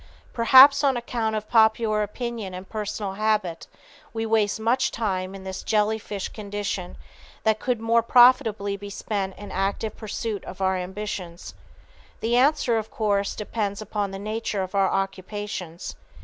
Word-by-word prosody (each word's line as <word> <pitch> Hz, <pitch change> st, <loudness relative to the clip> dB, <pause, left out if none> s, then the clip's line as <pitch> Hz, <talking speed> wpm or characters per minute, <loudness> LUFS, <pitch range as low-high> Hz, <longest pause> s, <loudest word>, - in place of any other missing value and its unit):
Perhaps 265 Hz, +4 st, +7 dB
on 270 Hz, -3 st, +3 dB
account 230 Hz, -2 st, -2 dB
of 215 Hz, 0 st, -4 dB
popular 220 Hz, -1 st, +3 dB
opinion 215 Hz, -2 st, -4 dB
and 185 Hz, +1 st, -8 dB
personal 210 Hz, -2 st, -4 dB
habit, 210 Hz, -4 st, -1 dB, 0.5 s
we 225 Hz, 0 st, -1 dB
waste 220 Hz, -1 st, +1 dB
much 235 Hz, +4 st, +2 dB
time 190 Hz, -4 st, -2 dB
in 195 Hz, -, -9 dB
this 190 Hz, 0 st, -5 dB
jelly 215 Hz, 0 st, +1 dB
fish 200 Hz, -2 st, -5 dB
condition 200 Hz, -3 st, -5 dB, 0.5 s
that 220 Hz, -1 st, +2 dB
could 250 Hz, -3 st, -1 dB
more 230 Hz, +1 st, +3 dB
profitably 225 Hz, -4 st, +4 dB
be 200 Hz, 0 st, -8 dB
spent 200 Hz, -1 st, -3 dB
in 205 Hz, -, -9 dB
active 200 Hz, +3 st, -2 dB
pursuit 215 Hz, -1 st, -4 dB
of -, -, -9 dB
our 190 Hz, 0 st, +1 dB
ambitions. 185 Hz, -2 st, -5 dB, 0.7 s
The 235 Hz, +2 st, 0 dB
answer, 255 Hz, -3 st, +3 dB
of 220 Hz, -, -7 dB
course, 200 Hz, -2 st, 0 dB
depends 205 Hz, -1 st, -3 dB
upon 210 Hz, -1 st, -3 dB
the 195 Hz, -, -6 dB
nature 215 Hz, -1 st, -3 dB
of 185 Hz, +1 st, -7 dB
our 195 Hz, -1 st, +3 dB
occupations. 195 Hz, -2 st, -4 dB
210 Hz, 150 wpm, -25 LUFS, 195-225 Hz, 0.7 s, Perhaps